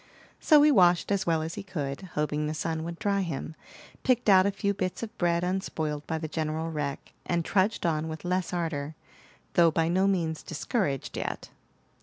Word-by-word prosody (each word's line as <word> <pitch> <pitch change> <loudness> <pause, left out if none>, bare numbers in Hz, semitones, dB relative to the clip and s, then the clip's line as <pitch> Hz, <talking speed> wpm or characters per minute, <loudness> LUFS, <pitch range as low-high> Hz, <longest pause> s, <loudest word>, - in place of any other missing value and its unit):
So 300 -2 +6
he 300 - +6
washed 180 -5 +4
as 200 -3 0
well 160 -2 +2
as 160 +1 -4
he - - -5
could, 150 -7 -4
hoping 150 0 0
the 155 - -3
sun 160 0 -2
would 170 0 -5
dry 200 +1 0
him, 160 -3 -4 0.5
picked 245 -3 +2
out 190 0 +7
a - - +1
few 200 0 -1
bits 185 +2 -3
of 220 - -7
bread 170 -1 +2
unspoiled 160 -5 -2
by 160 - -1
the 160 0 -4
general 160 +1 -2
wreck, 145 -2 -4
and 170 -1 -1
trudged 200 +1 +1
on 160 -1 0
with 160 +1 -7
less 180 0 0
ardor, 160 -4 -3 0.6
though 170 -1 +6
by 165 +1 +1
no 190 +3 +3
means 165 -5 0
discouraged 155 - -2
yet. - - -4
170 Hz, 190 wpm, -28 LUFS, 155-190 Hz, 0.6 s, out